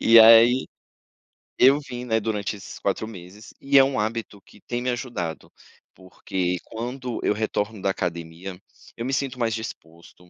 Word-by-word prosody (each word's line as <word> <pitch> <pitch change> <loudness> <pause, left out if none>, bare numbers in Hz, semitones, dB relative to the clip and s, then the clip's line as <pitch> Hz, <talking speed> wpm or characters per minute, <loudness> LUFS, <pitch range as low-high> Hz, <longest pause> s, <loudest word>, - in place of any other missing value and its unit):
E 115 0 +7
aí 115 +3 +7 0.9
eu 135 +3 +6
vim, 125 -3 -7
né, 110 -2 +1
durante 105 -1 -2
esses 100 - -10
4 100 +2 -1
meses, 100 +1 -12
e 140 0 +3
é 135 - +9
um 135 -4 0
hábito 110 -2 -3
que 105 - -20
tem 120 0 -4
me 125 - -1
ajudado, 120 -10 -4 0.4
porque 90 -1 -3
quando 125 +2 -5
eu - - +2
retorno 105 -1 -2
da 95 - +1
academia, 85 +1 -5 0.4
eu 115 - -4
me 135 - -2
sinto 135 -1 -2
mais 115 -2 0
disposto. 85 -4 -10
110 Hz, 165 wpm, -24 LUFS, 95-125 Hz, 0.9 s, é